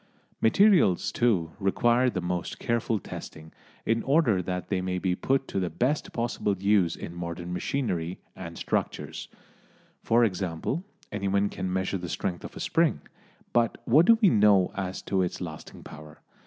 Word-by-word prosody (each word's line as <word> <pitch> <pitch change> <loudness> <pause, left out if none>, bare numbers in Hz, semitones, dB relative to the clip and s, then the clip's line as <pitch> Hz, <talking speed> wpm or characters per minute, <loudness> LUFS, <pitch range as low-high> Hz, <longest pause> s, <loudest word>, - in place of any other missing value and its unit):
Materials, 170 - +4
too, 95 -10 +1
require 120 +5 +3
the 95 -6 -3
most 90 0 -3
careful 115 -1 0
testing, 80 -4 -9 0.3
in 115 +1 +1
order 135 - +3
that 90 0 -4
they 95 -2 0
may 90 0 -2
be 90 0 0
put 135 +8 0
to - - -2
the 90 -2 -1
best 130 - -1
possible 115 -4 -1
use 100 -3 +2
in 85 - -7
modern 85 0 -5
machinery 90 -7 -2 0.2
and 85 -3 -8
structures. - - -3 0.7
For 115 +1 +4
example, 95 - -2 0.3
anyone 100 0 0
can 95 -1 -4
measure 95 +1 -1
the 90 -1 -6
strength 90 -1 -3
of - - -9
a - - -6
spring, - - +1 0.5
but 120 -1 +2
what 150 +9 +5
do 230 - +7
we 200 - +8
know 105 - +4
as 95 -1 -4
to 95 -1 0
its 90 - -2
lasting 80 -4 -8
power? 75 0 -12
95 Hz, 160 wpm, -27 LUFS, 90-115 Hz, 0.7 s, we